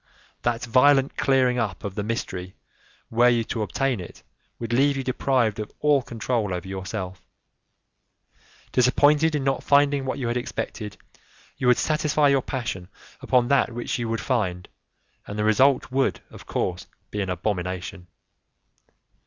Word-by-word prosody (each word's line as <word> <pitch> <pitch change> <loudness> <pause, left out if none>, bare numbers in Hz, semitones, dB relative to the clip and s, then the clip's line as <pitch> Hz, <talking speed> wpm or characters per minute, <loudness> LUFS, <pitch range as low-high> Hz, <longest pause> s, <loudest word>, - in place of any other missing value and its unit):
That 120 0 -1
violent 135 +3 +4
clearing 130 -2 +2
up 100 -7 -3
of 100 - -4
the 105 - -3
mystery, 95 -4 -4 0.6
were 120 +2 +5
you 120 -1 +2
to 110 0 -4
obtain 125 +4 -1
it, 90 - -10 0.3
would 115 0 -4
leave 140 +3 +3
you 135 - -2
deprived 125 -4 +1
of 105 - -5
all 145 -2 +3
control 115 -5 -2
over 90 +1 -6
yourself. 95 -1 -5 1.5
Disappointed 145 +5 +4
in 145 - -1
not 135 0 0
finding 140 -1 +3
what 130 - -2
you 125 - -2
had 120 +1 0
expected, 110 -3 -5 0.6
you 125 - -1
would 125 - +5
satisfy 150 -1 +2
your 135 -1 +3
passion 115 -10 -4 0.3
upon 125 -1 +2
that 140 -3 +3
which 120 +1 -3
you 115 -1 -2
would 115 0 -2
find, 95 -9 -1 0.6
and 105 - -6
the 105 - 0
result 130 +5 +3
would, 135 +1 +1
of - - -13
course, 90 -1 -2 0.2
be 105 - -2
an 95 - -3
abomination. 90 0 -3
120 Hz, 155 wpm, -24 LUFS, 100-135 Hz, 1.5 s, were